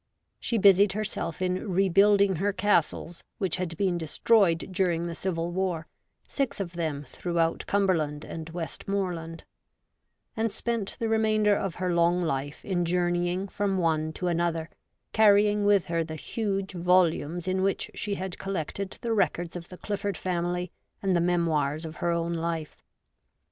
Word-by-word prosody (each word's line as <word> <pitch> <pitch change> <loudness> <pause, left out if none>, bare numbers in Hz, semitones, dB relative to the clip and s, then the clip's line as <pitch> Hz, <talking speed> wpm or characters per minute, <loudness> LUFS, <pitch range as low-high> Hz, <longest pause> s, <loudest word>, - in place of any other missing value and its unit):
She 235 - -1
busied 200 -1 +6
herself 210 -4 -2
in 185 +3 -1
rebuilding 195 +1 +4
her 200 +4 +1
castles, 185 -3 0
which 190 -4 -1
had 175 -3 -4
been 185 -3 +1
destroyed 170 +2 +2
during 175 -3 +1
the 170 - -3
Civil 170 -1 -2
War, 175 -3 -1 0.4
six 275 -6 -2
of 180 -3 -4
them 155 -4 -2
throughout 165 +4 -1
Cumberland 165 -7 +1
and 160 0 -7
West 165 -3 -6
moreland; 175 -5 -3 0.9
and 225 -1 0
spent 230 -3 -3
the 230 - -1
remainder 215 -2 +3
of 195 -4 -2
her 180 -1 -1
long 170 +1 +3
life 145 -2 -3
in 180 -3 0
journeying 175 +2 0
from 200 -1 -1
one 160 -3 +1
to 180 - -4
another, 170 -2 0 0.4
carrying 210 -1 +5
with 205 -3 +4
her 165 0 0
the 160 0 -6
huge 195 +3 -2
volumes 175 -1 +2
in 185 0 +1
which 195 0 0
she 205 -1 -2
had 190 -1 -5
collected 195 +1 -4
the 230 -1 -1
records 175 -5 0
of 175 -1 -7
the 180 - -10
Clifford 205 -2 -3
family 175 -1 -2 0.3
and 190 -2 +2
the 170 - +3
memoirs 165 -3 +1
of 160 0 -8
her 175 - -1
own 170 0 0
life. 165 -2 -3
180 Hz, 155 wpm, -27 LUFS, 165-195 Hz, 0.9 s, busied